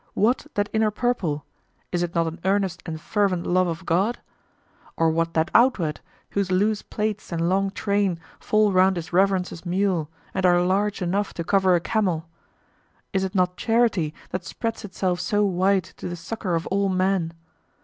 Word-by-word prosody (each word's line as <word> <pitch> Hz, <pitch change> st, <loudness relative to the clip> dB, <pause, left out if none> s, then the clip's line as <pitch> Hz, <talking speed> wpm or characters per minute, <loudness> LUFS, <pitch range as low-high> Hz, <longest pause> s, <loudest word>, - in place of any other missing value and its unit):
What 240 Hz, +8 st, +2 dB
that 205 Hz, 0 st, +1 dB
inner 220 Hz, -1 st, +3 dB
purple; 205 Hz, -, -1 dB, 0.5 s
is 175 Hz, -, 0 dB
it 175 Hz, 0 st, -3 dB
not 165 Hz, 0 st, +3 dB
an 165 Hz, +1 st, -5 dB
earnest 190 Hz, -3 st, 0 dB
and 160 Hz, -1 st, -4 dB
fervent 195 Hz, -1 st, 0 dB
love 185 Hz, +1 st, +2 dB
of 165 Hz, +1 st, -4 dB
God? 195 Hz, +8 st, +1 dB, 0.8 s
Or 165 Hz, -1 st, +3 dB
what 165 Hz, +1 st, -1 dB
that 160 Hz, +3 st, +1 dB
outward, 195 Hz, -, +3 dB, 0.3 s
whose 200 Hz, -2 st, 0 dB
loose 205 Hz, +3 st, +2 dB
plaits 210 Hz, -2 st, -3 dB
and 170 Hz, 0 st, 0 dB
long 195 Hz, +2 st, +2 dB
train 200 Hz, -3 st, 0 dB, 0.2 s
fall 215 Hz, -1 st, +2 dB
round 190 Hz, 0 st, +4 dB
his 170 Hz, 0 st, -6 dB
Reverence's 185 Hz, -2 st, +1 dB
mule 180 Hz, -3 st, 0 dB, 0.2 s
and 190 Hz, -, -1 dB
are 175 Hz, -1 st, +5 dB
large 195 Hz, +2 st, 0 dB
enough 195 Hz, +3 st, -1 dB
to 170 Hz, -, -3 dB
cover 190 Hz, 0 st, +3 dB
a -, -, +3 dB
camel; 175 Hz, -3 st, -1 dB, 0.9 s
is 190 Hz, -1 st, +1 dB
it 190 Hz, +1 st, -3 dB
not 180 Hz, -1 st, +1 dB
charity 225 Hz, -9 st, +2 dB, 0.2 s
that 185 Hz, -, -3 dB
spreads 225 Hz, +3 st, -4 dB
itself 185 Hz, -3 st, -2 dB
so 205 Hz, +3 st, +1 dB
wide 190 Hz, 0 st, +2 dB
to 180 Hz, -, -8 dB
the 175 Hz, -, -4 dB
succor 180 Hz, +1 st, -3 dB
of 165 Hz, -, -2 dB
all 200 Hz, 0 st, +2 dB
men? 185 Hz, -2 st, +1 dB
185 Hz, 175 wpm, -24 LUFS, 175-205 Hz, 0.9 s, are